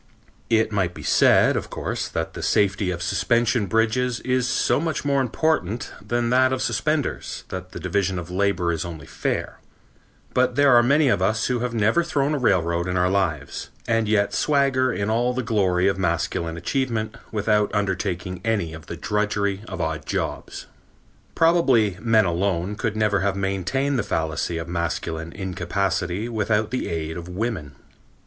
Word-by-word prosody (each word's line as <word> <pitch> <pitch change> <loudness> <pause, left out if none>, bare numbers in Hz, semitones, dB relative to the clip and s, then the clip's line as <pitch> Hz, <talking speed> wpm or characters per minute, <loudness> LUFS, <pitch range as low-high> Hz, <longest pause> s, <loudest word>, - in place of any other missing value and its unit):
It 110 -1 +2
might 95 -4 0
be - - -9
said, - - +4
of - - -3
course, - - -3
that - - -3
the - - -7
safety 100 -1 +1
of 85 -1 -3
suspension 105 +4 +1
bridges 115 +3 +1
is 125 -1 0
so 125 - +2
much 160 -2 -2
more 140 -1 +2
important 120 - -1
than 120 +2 -1
that 130 +1 +4
of 130 -1 -1
suspenders 140 +5 -1
that 90 0 -6
the - - -7
division 100 -2 0
of 90 0 -6
labor 90 -2 +1
is 80 - -2
only 85 -4 -7
fair, - - -3 0.7
but 125 -1 +2
there 140 -2 +5
are 120 - +8
many 140 +5 +3
of 120 - +2
us 110 +3 +1
who 125 -1 0
have 120 0 -2
never 110 +10 +3
thrown 145 -3 0
a 150 - 0
railroad 85 -6 +1
in 90 0 -1
our 90 +1 +2
lives, 80 -8 -1 0.2
and 115 -2 +1
yet 100 -1 +2
swagger 135 -3 +2
in 100 -1 -1
all 120 +2 +1
the 130 - -1
glory 95 -5 +2
of 95 -1 0
masculine 85 -1 -1
achievement 115 +1 -2 0.2
without 105 -1 +1
undertaking 95 -2 -2
any 100 -8 0
of 80 -1 -10
the - - -6
drudgery 105 -1 -1
of 95 - -6
odd 80 -1 -3
jobs. - - -3 0.7
Probably 135 - +3
men 115 -2 +4
alone 90 +1 0
could 110 0 -2
never 105 -2 +2
have 95 +1 0
maintained 100 +9 -1
the - - +3
fallacy 80 -1 -2
of 80 0 -5
masculine 85 -1 -3
incapacity 95 +1 -2
without 110 -1 0
the 130 - -2
aid 80 0 -3
of 85 +1 -8
women. 90 - -3
105 Hz, 170 wpm, -23 LUFS, 90-120 Hz, 0.7 s, are